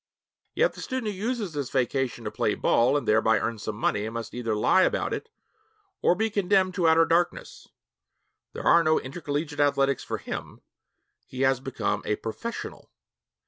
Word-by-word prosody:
Yet -, -, +2 dB
the -, -, -10 dB
student 255 Hz, -5 st, -3 dB
who 185 Hz, -, -10 dB
uses 220 Hz, -5 st, -2 dB
this 145 Hz, -3 st, -3 dB
vacation 130 Hz, 0 st, -1 dB
to -, -, -3 dB
play -, -, 0 dB
ball 125 Hz, +5 st, +3 dB
and 145 Hz, -, -4 dB
thereby 110 Hz, +1 st, +4 dB
earn 115 Hz, -1 st, -2 dB
some 105 Hz, +1 st, -4 dB
money 105 Hz, 0 st, -1 dB
must 115 Hz, 0 st, -6 dB
either 115 Hz, -3 st, -2 dB
lie 105 Hz, -, +4 dB
about -, -, +1 dB
it 455 Hz, -, -5 dB, 0.7 s
or 175 Hz, -, +4 dB
be 220 Hz, +3 st, 0 dB
condemned 190 Hz, -2 st, +2 dB
to 180 Hz, -3 st, +1 dB
outer 165 Hz, +1 st, +5 dB
darkness. 170 Hz, +2 st, -1 dB, 0.9 s
There -, -, -6 dB
are 170 Hz, 0 st, +6 dB
no 155 Hz, 0 st, +3 dB
intercollegiate 145 Hz, +1 st, -4 dB
athletics 140 Hz, -1 st, +2 dB
for -, -, -3 dB
him; -, -, -7 dB, 0.7 s
he 130 Hz, -, -6 dB
has 135 Hz, -1 st, +3 dB
become 130 Hz, -6 st, -2 dB
a 105 Hz, -, 0 dB
'professional.' 230 Hz, -, -6 dB
145 Hz, 170 wpm, -26 LUFS, 120-185 Hz, 0.9 s, are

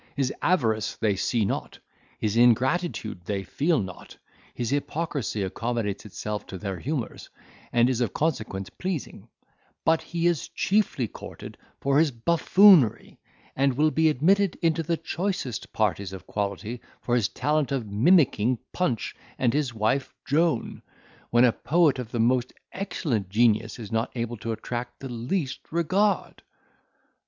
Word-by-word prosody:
His 135 Hz, -2 st, 0 dB
avarice 110 Hz, -, +1 dB
they 105 Hz, -3 st, +1 dB
see 110 Hz, +3 st, +1 dB
not, -, -, -3 dB, 0.4 s
his 105 Hz, 0 st, -1 dB
ingratitude 120 Hz, -, +2 dB
they 100 Hz, +1 st, -2 dB
feel 150 Hz, -, +1 dB
not, 95 Hz, -3 st, -7 dB, 0.4 s
his 120 Hz, 0 st, -2 dB
hypocrisy 145 Hz, -6 st, -2 dB
accommodates 110 Hz, +1 st, -3 dB
itself 105 Hz, +1 st, -5 dB
to 95 Hz, -, -7 dB
their 95 Hz, -1 st, -4 dB
humours, 135 Hz, -, -4 dB, 0.4 s
and 120 Hz, 0 st, +4 dB
is 125 Hz, -1 st, 0 dB
of 115 Hz, -5 st, +1 dB
consequence 110 Hz, -11 st, -2 dB
pleasing; 185 Hz, -6 st, -5 dB, 0.6 s
but 160 Hz, 0 st, +3 dB
he 170 Hz, +1 st, -3 dB
is 175 Hz, -3 st, +1 dB
chiefly 195 Hz, -, +1 dB
courted -, -, -10 dB, 0.2 s
for 140 Hz, +1 st, +2 dB
his 160 Hz, -1 st, +4 dB
buffoonery, 170 Hz, -, +4 dB, 0.4 s
and 135 Hz, 0 st, +2 dB
will 155 Hz, +3 st, +3 dB
be 160 Hz, 0 st, +3 dB
admitted 185 Hz, +6 st, +3 dB
into 165 Hz, -1 st, +2 dB
the 165 Hz, +1 st, -1 dB
choicest 175 Hz, -, -3 dB
parties 100 Hz, -3 st, -1 dB
of 95 Hz, -, -9 dB
quality 105 Hz, +4 st, -3 dB, 0.2 s
for 120 Hz, -, -1 dB
his 120 Hz, -5 st, +2 dB
talent 150 Hz, -1 st, 0 dB
of 135 Hz, -4 st, -1 dB
mimicking 125 Hz, -, +3 dB, 0.2 s
Punch 130 Hz, -11 st, -1 dB, 0.2 s
and 120 Hz, -3 st, +2 dB
his 145 Hz, -3 st, 0 dB
wife 115 Hz, +5 st, -1 dB
Joan, 150 Hz, -3 st, +1 dB, 0.5 s
when 120 Hz, +1 st, +5 dB
a 120 Hz, -, +5 dB
poet 155 Hz, +1 st, +2 dB
of 120 Hz, -3 st, -5 dB
the 120 Hz, -, -2 dB
most 125 Hz, +2 st, +2 dB, 0.2 s
excellent 130 Hz, -, -2 dB
genius 110 Hz, 0 st, +2 dB
is 110 Hz, -4 st, -8 dB
not 115 Hz, +1 st, 0 dB
able 120 Hz, 0 st, -3 dB
to 115 Hz, +2 st, -4 dB
attract 120 Hz, +2 st, -5 dB
the 135 Hz, -, -7 dB
least 130 Hz, +5 st, -3 dB
regard." 185 Hz, +5 st, +1 dB
125 Hz, 145 wpm, -26 LUFS, 110-160 Hz, 0.6 s, when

